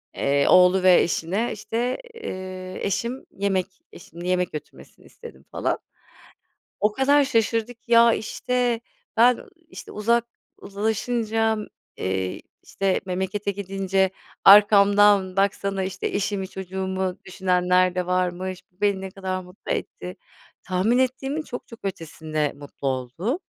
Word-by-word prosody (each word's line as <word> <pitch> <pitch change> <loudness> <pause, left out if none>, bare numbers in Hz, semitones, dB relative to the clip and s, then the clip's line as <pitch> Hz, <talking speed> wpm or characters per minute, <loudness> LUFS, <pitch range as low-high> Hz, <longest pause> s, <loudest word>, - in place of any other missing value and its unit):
eee, 140 0 +2
oğlu 180 +1 +6
ve 185 -1 +7
eşine 185 +7 -1
işte, 235 +4 -2 0.2
eee, 185 - -7
eşim 235 +6 -2
yemek, 195 -2 0 0.3
eşimin 170 0 -11
yemek 180 -1 0
götürmesini 150 -1 -10
istedim 470 0 -13
falan. - - -1 1.0
O 210 - +2
kadar 285 +3 +4
şaşırdı 230 -3 0
ki, 230 +1 -17
"Ya 235 0 +7
işte 245 +2 -1 0.4
ben 245 +2 +5 0.3
işte - - -10
uzak 235 +3 +1 0.3
uzlaşınca, 220 +2 -1 0.4
eee, 95 0 -2 0.2
işte 195 -1 -1
memlekete 190 +2 -2
gidince, 195 -1 0 0.4
arkamdan 200 -1 +6
baksana 195 0 0
işte 185 0 -3
eşimi 200 -1 -2
çocuğumu 190 0 -3
düşünenler 180 -1 +2
de 180 -1 -1
varmış, 180 0 -1
bu 180 - -37
beni 200 -2 +2
ne 190 -1 -6
kadar 185 -1 -4
mutlu 180 +1 -9
etti." 180 +1 -4 0.5
tahmin 190 +6 +1
ettiğimin 270 +4 0
çok 245 -5 -8
çok 230 - -12
ötesinde 155 -4 -3
mutlu 140 -1 -7
oldu. 135 - -2
195 Hz, 125 wpm, -24 LUFS, 180-225 Hz, 1.0 s, ve